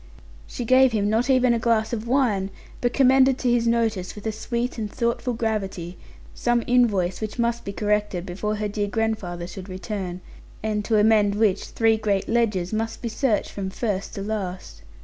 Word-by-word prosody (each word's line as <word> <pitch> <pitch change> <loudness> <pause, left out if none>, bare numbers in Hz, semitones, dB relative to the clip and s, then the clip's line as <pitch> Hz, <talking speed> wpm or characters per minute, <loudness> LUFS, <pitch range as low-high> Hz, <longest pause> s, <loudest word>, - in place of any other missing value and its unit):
She 245 - -5
gave 255 +1 +5
him 205 -1 +1
not 230 +4 +1
even 255 -2 +4
a 235 - +1
glass 225 -1 +1
of 230 0 -3
wine, 230 -7 +1 0.3
but 245 - +1
commended 265 0 +4
to 250 -2 +1
his 235 -1 +2
notice, 225 -5 0
with 210 - -10
a 220 - 0
sweet 235 +3 -3
and 210 -2 -3
thoughtful 240 +1 -1
gravity, 195 -6 -3 0.4
some 240 -1 +1
invoice 205 -8 +2
which 215 +1 -4
must 235 0 0
be 200 - -4
corrected, 210 -3 -1
before 210 +3 -3
her 210 0 -2
dear 205 0 -2
grandfather 200 -5 -2
should 185 +2 -9
return; 185 -1 -5 0.4
and 210 -1 -1
to 220 - +2
amend 210 -1 +4
which 210 -3 +2
three 225 -1 +2
great 205 -3 0
ledgers 215 -6 0
must 225 +2 -3
be 235 - -1
searched 225 -1 0
from 195 -2 -4
first 200 0 -3
to 195 - -4
last. 195 -4 -5
220 Hz, 185 wpm, -24 LUFS, 200-235 Hz, 0.4 s, gave